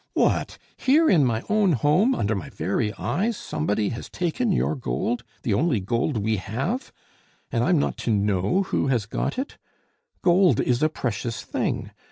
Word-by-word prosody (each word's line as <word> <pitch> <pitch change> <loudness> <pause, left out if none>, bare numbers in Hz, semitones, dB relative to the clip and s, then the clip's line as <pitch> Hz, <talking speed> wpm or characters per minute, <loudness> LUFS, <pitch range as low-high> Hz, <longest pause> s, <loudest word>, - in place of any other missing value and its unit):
"What! - - +1 0.2
here, 310 +5 +4
in 160 -6 +5
my 115 -2 0
own 210 -4 +3
home, 150 - +3
under 105 +1 0
my 95 -6 -4
very 105 - -1
eyes, 215 - -1
somebody 100 +6 -1
has 115 - -6
taken 180 +7 -1
your 175 - +1
gold! 120 -2 -2 0.2
the 110 - +1
only 140 +1 +2
gold 115 +7 -1
we 110 +1 0
have! 135 - -3 0.6
and 115 -1 +1
I'm 175 +3 +3
not 145 - 0
to 120 - -2
know 105 - +1
who 185 - -1
has 120 -6 +1
got 110 - -3
it! 265 +2 -4 0.6
Gold 180 +1 +4
is 125 0 +1
a 155 - +4
precious 120 -5 -3
thing. - - -2
130 Hz, 170 wpm, -24 LUFS, 110-185 Hz, 0.6 s, in